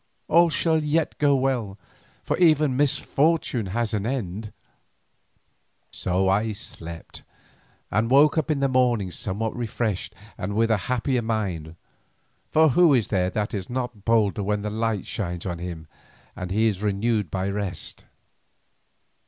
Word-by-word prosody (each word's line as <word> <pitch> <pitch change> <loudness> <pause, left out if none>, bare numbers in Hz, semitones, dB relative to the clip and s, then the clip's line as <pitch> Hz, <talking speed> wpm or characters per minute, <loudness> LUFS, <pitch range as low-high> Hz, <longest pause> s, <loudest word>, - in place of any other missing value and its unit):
All 170 +2 +5
shall 160 +1 +1
yet 155 +1 0
go 145 -1 +4
well, 125 -7 -1 0.5
for - - 0
even 155 -6 +4
misfortune 140 -3 +1
has 115 +3 -1
an 105 0 -1
end." 110 -5 -3 1.4
So 95 +1 0
I 105 +3 +1
slept, 85 -5 -8 0.7
and 110 +2 +1
woke 145 +3 +5
in 145 -3 0
the 140 - +3
morning 120 -7 +2
somewhat 105 +4 -3
refreshed 110 -4 -3 0.2
and 100 +3 -3
with 115 +1 +2
a 110 - +4
happier 125 0 +1
mind, 95 -9 -3 0.7
for 160 0 +5
who 160 +1 +5
is 115 -5 0
there 90 -3 +1
that 105 +2 -2
is 95 -3 -4
not 125 -4 -4
bolder 110 -3 +2
when 105 +1 -1
the 105 - -3
light 110 -2 -1
shines 90 -4 -4
on 90 -3 -3
him 85 -3 -6 0.5
and 90 -1 -5
he 110 +4 +2
is 100 -3 -1
renewed 105 -1 0
by 95 +3 -2
rest? 100 -3 -4
110 Hz, 145 wpm, -24 LUFS, 95-130 Hz, 1.4 s, All